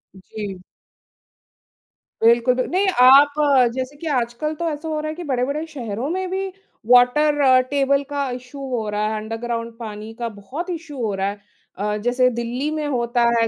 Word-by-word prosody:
जी। 195 0 -7 1.6
बिल्कुल, 235 +2 +5
बि 255 - +1
नहीं 380 +3 +1
आप 275 +3 +8 0.4
जैसे 260 +2 -4
कि 325 - -7
आजकल 240 +6 -3
तो 335 +2 -2
ऐसा 305 +1 -5
हो 310 -1 -2
रहा 305 0 -3
है 310 - -5
कि 350 - -7
बड़े-बड़े 280 +2 -1
शहरों 250 -4 -4
में 370 +2 -2
भी 385 +1 -2 0.4
वाटर 260 +1 +5
टेबल 280 0 +2
का 285 -2 -2
इशू 250 +3 -8
हो 235 -4 -2
रहा 210 0 -1
है, 220 - -2
अन्डरग्राउन्ड 230 +1 -4
पानी 215 -1 -7
का 235 -1 -2
बहुत 295 - -6
इशू 325 -4 -6
हो 215 -2 -1
रहा 195 0 -1
है। 205 0 -7 0.4
अ, 210 +2 -1
जैसे 250 +1 +3
दिल्ली 245 +5 -2
में 310 -1 -2
होता 240 -3 0 0.2
है 230 - +3
255 Hz, 175 wpm, -21 LUFS, 230-295 Hz, 1.6 s, आप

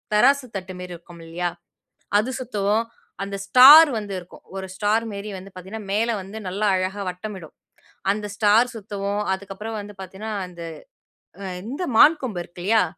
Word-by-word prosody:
தராசு 275 +4 +4
தட்டு 185 0 -7
மாரி 180 -1 -7
இருக்கும் 170 0 -15
இல்லையா, 175 +1 -2 0.7
அது 235 +5 0
சுத்துவோம் 215 -2 0 0.4
அந்த 200 0 -5
ஸ்டார் 285 +8 +10
வந்து 205 -2 -6
இருக்கும். 175 0 -13
ஒரு 190 0 -4
ஸ்டார் 215 +3 +1
மேரி 200 +1 -6
வந்து 195 +2 -11
பாத்தீங்கன்னா, 195 +4 -8
மேல 225 +3 +1
வந்து 195 +3 -10
நல்லா 205 +3 -1
அழகா 190 +2 -2
வட்டமிடும். 180 -2 -8 0.6
அந்த 210 +1 -3
ஸ்டார் 220 +3 +4
சுத்துவோம். 205 -1 -3
அதுக்கப்புறம் 200 +3 -6
வந்து 205 0 -10
பாத்தீங்கன்னா, 195 +4 -6
அந்த, 175 -1 -12 0.8
அ - - -6 0.3
இந்த 315 +7 -3
மான் 315 +1 +7
கொம்பு 190 -8 -3
இருக்கு 175 +1 -12
இல்லையா! 220 -3 +4
205 Hz, 155 wpm, -23 LUFS, 185-220 Hz, 0.8 s, ஸ்டார்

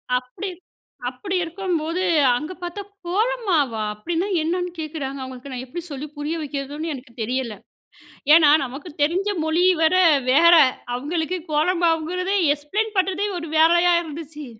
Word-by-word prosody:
அப்டி, 250 +11 -4 0.6
அப்டி 370 +10 -5
இருக்கும்போது 340 0 -2 0.3
அங்கே 305 +8 -5
பார்த்தா" 350 +4 -5 0.3
கோலமாவா? 370 - 0
அப்டீனா 335 - -2 0.2
என்ன"ன்னு 355 +2 -1
கேட்குறாங்க 290 -3 -5
அவங்களுக்கு 260 +1 -9
நான் 255 0 -5
எப்படி 335 +7 -6
சொல்லி 280 +2 -5
புரிய 295 +3 -3
வைக்கிறதுன்னு 290 +2 -4
எனக்கு 250 -3 -11
தெரியல. 240 -1 -2 0.8
ஏன்னா 310 -3 +6 0.2
நமக்கு 275 +7 -8
தெரிஞ்ச 365 +7 +1 0.2
மொழி 320 +3 +2 0.2
வரை 370 +4 +4 0.3
வேற 335 +5 +7 0.4
அவங்களுக்கு 320 +6 -2
கோலமாவுங்குறது 345 +3 +1 0.2
எக்ஸ்ப்ளைன் 415 +9 -3
பண்ணுறதே 380 +2 +1
ஒரு 330 -2 -6
வேலையா 345 +2 +5
இருந்துச்சு. 305 -1 -8
320 Hz, 125 wpm, -22 LUFS, 280-360 Hz, 0.8 s, வேற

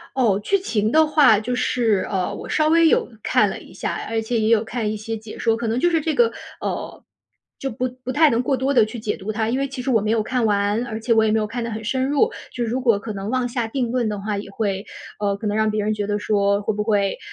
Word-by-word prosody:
哦， 225 -7 +2
剧 395 - +2
情 220 - 0
的 315 +2 +5
话 290 -9 +5
就 245 +3 -2
是 230 -5 +1
呃， 185 -3 -1
我 - - -8
稍 310 0 +2
微 330 +1 +5
有 - - +2
看 - - +3
了 - - -6
一 - - -15
下， - - -3 0.2
而 225 0 0
且 230 +2 -1
也 215 0 +1
有 225 -1 +4
看 220 -1 -2
一 215 - -3
些 225 +2 -4
解 220 0 -10
说。 225 -1 +2
可 230 0 -3
能 225 +2 0
就 350 - +3
是 325 -2 +1
这 315 +1 -1
个， 470 -1 +3 0.3
呃， - - -4 0.6
就 270 - -4
不 250 +3 -2 0.2
不 255 - -3
太 305 +3 +5
能 235 0 +1
过 265 +1 +1
多 270 +2 0
地 235 -5 +5
去 220 +2 -7
解 215 -1 -2
读 210 +1 -5
它， 220 +1 -1
因 245 - 0
为 275 0 -1
其 265 -1 -5
实 260 - -3
我 225 -4 +3
没 215 +1 0
有 225 -1 +2
看 245 +2 -1
完， 205 +2 +1
而 220 -2 -5
且 230 +1 +1
我 220 -1 +4
也 220 - +2
没 220 - +2
有 215 - -1
看 235 +2 -4
得 230 - -4
很 220 0 -4
深 260 +3 0
入， 285 -1 +3 0.2
就 240 - -2
如 240 +3 -2
果 230 -5 +3
可 215 +1 -6
能 195 +1 -5
妄 255 0 0
下 240 -2 -2
定 245 +1 -2
论 240 -2 0
的 210 -1 -3
话， 205 +1 -3
也 200 - -6
会， 200 -2 -2 0.4
呃， 200 -1 0
可 210 - -4
能 205 - -1
让 220 0 +2
别 215 0 -1
人 215 +1 0
觉 210 -1 -2
得 205 0 -1
说 200 -1 +1
会 215 - -1
不 210 - -1
会 205 -3 +1
225 Hz, 310 characters per minute, -22 LUFS, 210-255 Hz, 0.6 s, 的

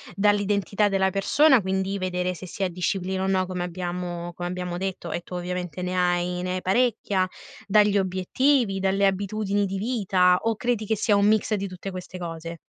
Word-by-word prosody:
dall'identità 205 0 +2
della 190 -1 +2
persona, 265 - +4
quindi 190 +1 -1
vedere, 180 -1 -1
se 185 - -9
si 195 - -4
ha 190 - +1
disciplina 185 +1 -2
o - - 0
no, 190 -1 +2
come 180 -1 -3
abbiamo 175 -1 -4
come 175 +1 -4
abbiamo 180 -1 -4
detto, 185 -2 -4
e 175 - -2
tu 180 - -9
ovviamente 180 -1 -4
ne 180 0 -2
hai 180 0 +1
ne 180 0 -2
hai 185 - -3
parecchia 200 -2 +1 0.4
dagli 205 0 +4
obiettivi, 195 +4 +1
dalle 195 +1 +2
abitudini 200 +1 0
di 195 0 -3
vita, 190 -5 +2
o 225 0 +1
credi 240 -3 -1
che 220 +1 0
sia 210 +1 +2
un 200 0 +4
mix 215 0 +2
di 200 -1 -3
tutte 185 +2 -7
queste 185 0 -7
cose? 165 -1 -6
190 Hz, 190 wpm, -25 LUFS, 180-205 Hz, 0.4 s, persona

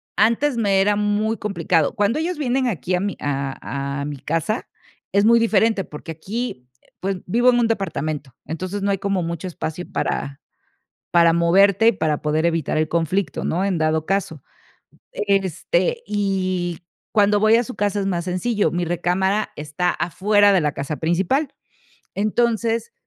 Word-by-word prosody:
antes 235 +5 +2
me 200 -4 +2
era 205 +1 +3
muy 210 +1 0
complicado. 180 -6 0
Cuando 205 +8 +1
ellos 335 +1 -2
vienen 260 -2 0
aquí 180 - -1
a 180 - 0
mi 200 -1 -2
a 140 0 -3
a 140 - -3
mi 145 -1 -5
casa, 165 - -2 0.4
es 200 +1 +3
muy 235 +1 +6
diferente 220 -2 +2
porque 160 0 -8
aquí, 185 - -5 0.3
pues, 195 0 -1
vivo 240 +7 +3
en 245 - +2
un 235 - +3
departamento, 155 - -3
entonces 185 +6 -4
no 200 - +1
hay 195 - +1
como 195 -1 -1
mucho 170 +1 -4
espacio 175 0 -5
para 140 0 -2 0.7
para 170 -1 +5
moverte 195 +6 +4
y - - +4
para 155 -7 -1
poder 155 +2 0
evitar 165 -4 0
el 155 0 +1
conflicto, 170 +4 -1
¿no?, 180 +4 0
en 195 -3 0
dado 155 0 +1
caso. 185 -6 -2 0.7
Este, 200 - 0
y 185 -4 -1 0.3
cuando 205 -1 +3
voy 215 +2 +5
a 240 - +2
su 250 - -7
casa 205 0 0
es 195 - -2
más 175 -3 -1
sencillo, 205 +4 0
mi 175 0 -1
recámara 190 +5 0
está 150 +4 -1
afuera 205 +4 +3
de 190 - +4
la 150 - 0
casa 140 +2 -4
principal, 185 - 0 0.7
entonces, 230 +2 0
195 Hz, 165 wpm, -21 LUFS, 165-215 Hz, 0.7 s, muy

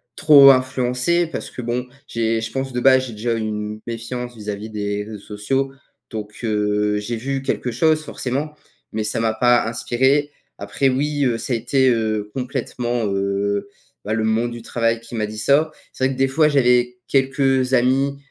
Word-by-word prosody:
trop 145 -3 +8
influencé 130 +6 +1
parce 165 - -6
que, - - -7
bon, 120 +1 -2 0.2
j'ai 115 -1 0
je 110 0 -4
pense, 135 0 -3
de 125 - -2
base, 130 0 +4
j'ai - - -7
déjà 115 +2 -2
une 110 -1 -4
méfiance 120 +1 -5
vis 105 0 -7
à 105 - -1
vis 105 +2 -8
des 105 -1 -3
réseaux 105 0 -8
sociaux. 135 +7 -2 0.4
Donc, 105 -1 -6
heu, 105 -1 +1
j'ai 115 +3 -4
vu 135 +3 -3
quelque 125 -2 -2
chose, 155 +5 +2
forcément, 140 +3 -3 0.4
mais, 110 0 -1
ça 105 +1 -2
m'a 115 -1 +1
pas 120 +1 +3
inspiré. 130 +5 +1 0.3
Après, 100 +7 0
oui, 145 +2 0
heu, 120 -3 +1
ça - - -5
a 120 - +2
été, 130 +3 +2
heu, 110 -3 -1
complètement, 125 -2 -2
heu, 100 +1 -1 0.4
bah, 105 - -1
le 110 0 0
monde 110 +2 +1
du 120 0 -7
travail 115 0 -1
qui 115 +1 -14
m'a 110 -1 0
dit 105 +1 -8
ça. 145 +7 +2 0.2
C'est 130 - -1
vrai 135 - +1
que, - - -9
des 135 0 +2
fois, 150 +3 +3
j'avais 125 -3 +2
quelques 135 -1 +2
amis, 135 +3 +2
120 Hz, 190 wpm, -21 LUFS, 110-135 Hz, 0.4 s, trop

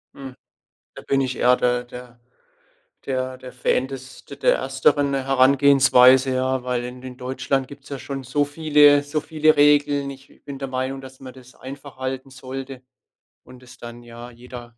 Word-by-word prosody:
Hm. 135 -1 -9 0.6
Da - - -11
bin 135 - 0
ich 130 -1 -2
eher 125 +1 +3
der 125 0 0
der 125 0 -12 0.8
der 130 -1 -3
der 130 0 -12
Fan 125 +1 -1
des 130 -1 -10
de - - -10
der - - +2
ersteren 145 - +1
Herangehensweise, 135 -1 +4
ja, 130 0 -1
weil 125 -1 -2
in 125 +1 -9
in 130 -1 -9
Deutschland 130 +1 -2
gibt's 140 +1 -14
ja 140 - -6
schon 135 +1 -6
so 140 +3 0
viele 145 -1 +4
so 145 +2 -3
viele 155 0 +1
Regeln. 145 -1 +3
Ich 135 0 -15
bin 140 -1 -8
der 135 - -4
Meinung, 130 +1 -3
dass 130 0 -13
man 130 -1 -10
das 130 -1 -16
einfach 135 +1 -11
halten 130 +1 -5
sollte 130 0 -8 0.6
und 125 0 -16
es 125 0 -16
dann 120 0 -11
ja 120 +1 -11
jeder 120 -1 -12
130 Hz, 175 wpm, -22 LUFS, 125-140 Hz, 0.8 s, Herangehensweise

